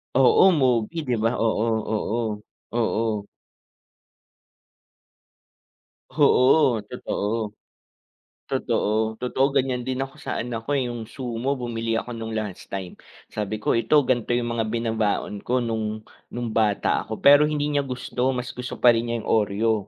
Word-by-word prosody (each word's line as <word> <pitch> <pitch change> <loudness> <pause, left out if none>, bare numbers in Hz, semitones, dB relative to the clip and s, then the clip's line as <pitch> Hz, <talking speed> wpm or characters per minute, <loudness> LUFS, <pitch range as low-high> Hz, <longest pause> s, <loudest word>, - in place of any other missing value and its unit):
Oo, 135 +7 +6
mobi, 125 +1 +1
di 125 - +1
ba? 115 - +4
Oo, 110 -1 +1 0.3
oo. 110 -1 -2 0.3
Oo. 110 -3 -1 2.8
Oo, 130 -3 +4
totoo. 110 -3 -3 1.0
Totoo. - - 0 0.3
Totoo, 125 +2 +1
ganyan 130 -2 0
din 130 0 -2
ako 135 0 -6
sa - - -3
anak 115 -1 -5
ko, 145 - -1
eh, 130 -3 0
yung 120 -2 -5
sumo, 125 +2 -3
bumili 115 -3 -3
ako 120 +2 -3
no'ng 115 0 -5
last 105 -4 -4
time, 95 -2 -5 0.3
sabi 105 0 -4
ko, 115 - +2
"Ito, 145 +6 +4
gan'to 120 -2 0
yung 120 -1 0
mga 115 - +1
binabaon 110 -3 -1
ko 125 +1 +1
no'ng 110 -2 -2 0.3
no'ng 120 -1 -3
bata 110 -2 +1
ako," - - -6
pero 145 +1 +7
hindi 150 -1 -1
niya 145 -1 0
gusto, 125 0 -2
mas 125 -1 -4
gusto 125 0 -6
pa 125 - +7
rin 115 0 +3
niya 115 -1 -2
yung - - -7
Oreo. 110 +1 +2
120 Hz, 145 wpm, -24 LUFS, 110-125 Hz, 2.8 s, pero